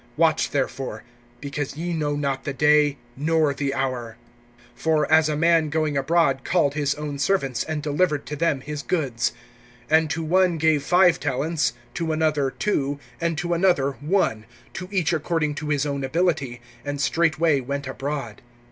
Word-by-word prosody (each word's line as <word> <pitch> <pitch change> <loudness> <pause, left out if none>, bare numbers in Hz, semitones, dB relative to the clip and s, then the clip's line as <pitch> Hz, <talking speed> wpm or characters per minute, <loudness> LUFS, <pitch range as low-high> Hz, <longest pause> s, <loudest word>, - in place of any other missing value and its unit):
(13)Watch, 160 -1 +3
therefore; 130 -5 -3 0.4
because 145 0 -4
ye 175 +2 -3
know 150 -2 -1
not 140 -2 -2
the 145 - -3
day, 150 0 +3 0.2
nor 155 0 +2
the 140 0 -2
hour! 125 -4 -3 0.6
(14)For 155 -2 +1
as 160 0 +5
a 150 - -1
man 165 -1 +3
going 155 -1 0
abroad 140 -1 +2
called 165 -6 +2
his 145 -1 0
own 145 -1 -5
servants, 135 -7 0
and 155 -2 -4
delivered 150 0 0
to 150 - -5
them 150 -3 0
his 150 +1 -5
goods; 135 -8 -1 0.6
(15)and 160 0 +4
to 160 +2 -2
one 180 +1 +2
gave 155 -2 +3
five 175 +3 +4
talents, 145 0 0 0.2
to 165 -2 -2
another 155 -3 +1
two, 140 -5 -1 0.2
and 170 -2 -1
to 175 +2 -1
another 170 -6 +2
one, 145 - 0 0.3
to 180 0 -6
each 180 -5 +1
according 160 -1 0
to 150 +1 -5
his 145 -1 +1
own 140 -1 -2
ability; 135 -5 0 0.2
and 145 0 -4
straightway 160 0 +2
went 140 +2 -4
abroad. 135 -4 -5
150 Hz, 165 wpm, -24 LUFS, 140-165 Hz, 0.6 s, as